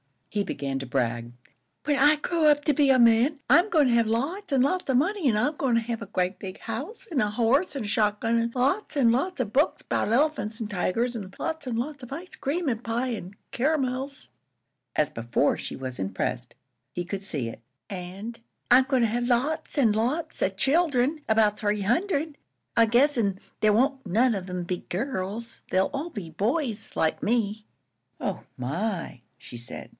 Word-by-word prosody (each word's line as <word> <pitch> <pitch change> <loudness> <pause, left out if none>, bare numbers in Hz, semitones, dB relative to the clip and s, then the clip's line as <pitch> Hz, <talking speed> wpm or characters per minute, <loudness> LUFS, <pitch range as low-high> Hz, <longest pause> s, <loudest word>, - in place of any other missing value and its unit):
He 205 -1 0
began 135 -6 -3
to 135 - -5
brag. 120 -2 -1 0.5
"When 290 -1 +1
I 295 +3 +6
grow 315 +1 +1
up 295 -1 +4
to 300 - +3
be 285 0 +3
a 265 - +6
man, 240 +5 +4
I'm 345 +10 +6
goin' 300 -8 +4
to - - +3
have 230 -1 +3
lots 285 - -2
an' 265 - +4
lots 355 +5 0
of 265 - +3
money, 350 +5 +2
an' 230 - +3
I'm 295 +8 +1
goin' 260 -4 +1
to 230 - +3
have 230 0 -4
a - - -4
grea' 185 -1 -1
big 190 -2 -7
house, 470 - -6
an' 295 - +1
a 210 -2 +2
horse 245 - +2
an' 270 - -2
a - - -4
shot 210 0 +1
gun, 230 +1 +2
an' 230 0 -1
lots 280 +13 0
an' 250 -5 +4
lots 275 +6 0
of 215 -5 -3
books 285 +7 +2
'bout - - -1
elephants 240 -4 +1
an' 215 - -3
tigers, 230 +5 0
an' 195 -3 -8
lots 320 -4 -4
an' 240 - -2
lots 280 +5 -3
of 250 +1 -8
ice 350 +6 -8
cream 310 +3 -1
an' 225 -3 -1
pie 240 +2 -2
an' 200 -5 -5 0.2
caramels." 270 0 -1 0.7
As 150 - +2
before, 120 +5 0
she - - -5
was 130 -3 -6
impressed; 95 +6 -3 0.4
he 175 - -2
could 195 +2 -5
see 140 - -2
it. 115 - -10 0.3
"An' 195 +4 -6 0.4
I'm 255 +1 +7
goin' 260 -2 +2
to 230 - +4
have 240 +2 -1
lots 295 +7 0
an' 240 -6 +5
lots 260 +10 -1
of 190 - +1
children 285 - +2
'bout 215 -1 +3
three 210 -1 0
hundred, 305 - 0 0.4
I 230 - +7
guess 255 +6 +3
an' 200 -4 0 0.2
there 215 -1 +4
won't 265 +3 +1
none 230 +7 +3
of 190 -2 -4
'em 180 -1 -3
be 180 +1 -2
girls. 215 +1 -4
They'll 190 +1 +2
all 290 +5 -3
be 205 - -7
boys 225 - -2
like 160 - +1
me." 215 -1 0 0.5
"Oh, - - -3
my!" 165 - -3 0.2
she 120 0 -10
said. 120 - -7
235 Hz, 200 wpm, -26 LUFS, 200-280 Hz, 0.7 s, I'm